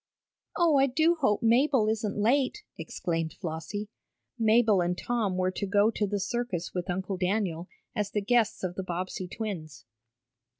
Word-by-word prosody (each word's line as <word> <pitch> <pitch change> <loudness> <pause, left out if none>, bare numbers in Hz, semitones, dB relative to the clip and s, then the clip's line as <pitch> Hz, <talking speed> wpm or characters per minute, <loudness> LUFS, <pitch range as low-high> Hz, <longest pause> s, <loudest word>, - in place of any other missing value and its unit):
"Oh, 335 -4 +4
I 270 0 +5
do 315 +6 +3
hope 235 -8 +2
Mabel 240 0 +4
isn't 215 -2 -1
late," 265 - +1
exclaimed 165 -2 -3
Flossie. 175 +4 -4 0.5
Mabel 220 -3 +4
and 175 +1 0
Tom 220 -6 -1
were 185 0 +1
to 200 +2 -3
go 205 +2 +3
to 210 -2 -1
the 205 +1 -1
circus 195 -4 -3
with 180 +1 -3
Uncle 190 +1 -2
Daniel, 180 -2 -1 0.3
as 210 -1 -1
the 210 - -1
guests 225 0 +1
of 180 -1 -2
the 190 - -4
Bobbsey 185 +1 -4
twins. 165 - -6
205 Hz, 160 wpm, -28 LUFS, 180-230 Hz, 0.5 s, I